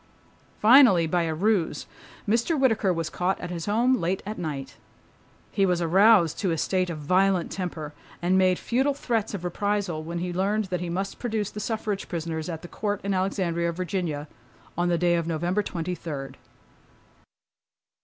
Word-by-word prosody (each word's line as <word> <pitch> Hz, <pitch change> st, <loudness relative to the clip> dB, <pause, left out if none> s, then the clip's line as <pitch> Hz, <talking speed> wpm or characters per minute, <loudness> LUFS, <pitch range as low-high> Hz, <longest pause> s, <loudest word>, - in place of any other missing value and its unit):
Finally 220 Hz, -7 st, +7 dB
by 175 Hz, +2 st, +1 dB
a 160 Hz, -1 st, -2 dB
ruse, 195 Hz, 0 st, 0 dB, 0.4 s
Mr. 235 Hz, +9 st, +1 dB
Whittaker 225 Hz, -7 st, +3 dB
was 165 Hz, -2 st, -2 dB
caught 180 Hz, +3 st, -1 dB
at 180 Hz, -, -6 dB
his 170 Hz, 0 st, -5 dB
home 235 Hz, +5 st, +3 dB
late 190 Hz, -5 st, -1 dB
at 215 Hz, +2 st, -5 dB
night. 140 Hz, -5 st, -5 dB, 0.7 s
He 195 Hz, -, +1 dB
was 180 Hz, -2 st, +2 dB
aroused 175 Hz, 0 st, +4 dB
to 195 Hz, -, 0 dB
a 165 Hz, -, 0 dB
state 185 Hz, +3 st, 0 dB
of 165 Hz, -, -4 dB
violent 185 Hz, +4 st, +2 dB
temper 160 Hz, -5 st, -5 dB, 0.3 s
and 180 Hz, +2 st, +1 dB
made 185 Hz, -1 st, +4 dB
futile 265 Hz, +4 st, 0 dB
threats 225 Hz, -6 st, -1 dB
of 185 Hz, -, -6 dB
reprisal 195 Hz, -2 st, -1 dB
when 170 Hz, +2 st, -5 dB
he 175 Hz, +1 st, -3 dB
learned 200 Hz, +4 st, 0 dB
that 180 Hz, -, -1 dB
he 175 Hz, -, -3 dB
must 195 Hz, +3 st, -3 dB
produce 220 Hz, -4 st, -2 dB
the 210 Hz, -, -7 dB
suffrage 215 Hz, -2 st, -3 dB
prisoners 160 Hz, -1 st, -3 dB
at 160 Hz, -2 st, -5 dB
the -, -, -7 dB
Court 205 Hz, +2 st, -3 dB
in 200 Hz, 0 st, -1 dB
Alexandria, 180 Hz, -3 st, 0 dB
Virginia, 170 Hz, -4 st, -3 dB, 0.5 s
on 175 Hz, +1 st, +1 dB
the 170 Hz, -, +2 dB
day 175 Hz, 0 st, +2 dB
of 170 Hz, -1 st, 0 dB
November 175 Hz, +5 st, 0 dB
twenty 180 Hz, -2 st, -4 dB
third. 145 Hz, -6 st, -6 dB
180 Hz, 175 wpm, -26 LUFS, 170-205 Hz, 0.7 s, Finally